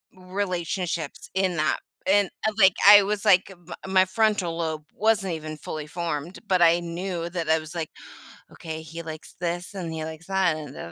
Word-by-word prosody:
Relationships, 180 -4 -3
in 190 -2 +1
that, 155 0 +1 0.3
and, 200 0 +4 0.2
eh, - - +2
like, 190 -4 +6
I 205 0 +10
was, 205 +1 -2
like 195 -1 +5
m 175 -2 -17 0.2
my 190 0 +5
frontal 190 -4 +1
lobe 160 -2 -3
wasn't 205 -4 +1
even 155 -1 -6
fully 155 0 -6
formed, 170 0 -4
but 185 -2 +2
I 170 0 +6
knew 170 0 -4
that 170 -2 -3
I 160 0 +4
was 155 +2 -10
like, 160 -2 -3 0.6
"Okay, 160 -1 -6
he 165 +1 -8
likes 160 -1 -9
this, 175 +2 -3
and 180 -4 -5
he 160 -1 -4
likes 160 +2 -9
that, 190 -4 +2
and 150 -3 -8
da 85 - -8
175 Hz, 185 wpm, -25 LUFS, 160-190 Hz, 0.6 s, I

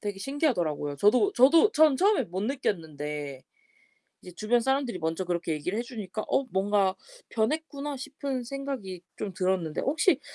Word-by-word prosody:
되게 205 -2 -4
신기하더라고요. 180 - -1
저도 250 - +4
저도 330 - +6
전 305 -3 +5
처음에 400 +6 +3
못 180 +3 -4
느꼈는데 150 - -3 0.8
이제 180 - -11
주변 220 +5 +2
사람들이 265 -5 0
먼저 160 +3 -1
그렇게 170 -2 -1
얘기를 165 +7 -3
해 - - 0
주니까 215 -3 -6
'어 275 - +2
뭔가 195 0 +2 0.4
변했구나.' 290 +4 -2
싶은 275 -1 -4
생각이 245 -8 -5 0.2
좀 200 -3 -4
들었는데 185 -4 -1
혹시 305 +2 +2
215 Hz, 355 characters per minute, -28 LUFS, 180-275 Hz, 0.8 s, 저도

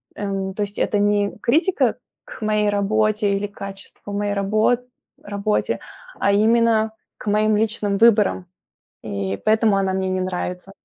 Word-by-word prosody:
эм, 195 -1 -3
то 210 - -2
есть 205 0 -7
это 205 - +1
не 205 0 +1
критика 330 +9 +2 0.3
к - - -11
моей 210 -1 +1
работе 210 +1 +1
или 205 +1 -2
к 205 - -25
качеству 195 +1 -9
моей 205 0 -1
рабо 210 +4 +2 0.5
работе, 205 +1 -1 0.4
а 200 - +2
именно 220 +1 +3 0.3
к - - -11
моим 215 +1 +3
личным 210 -2 0
выборам, 215 -4 +4 0.6
и 100 0 -3
поэтому 215 -1 +3
она 190 -1 +1
мне 190 0 -1
не 185 0 -1
нравится. 180 0 -4
205 Hz, 150 wpm, -21 LUFS, 195-215 Hz, 0.6 s, выборам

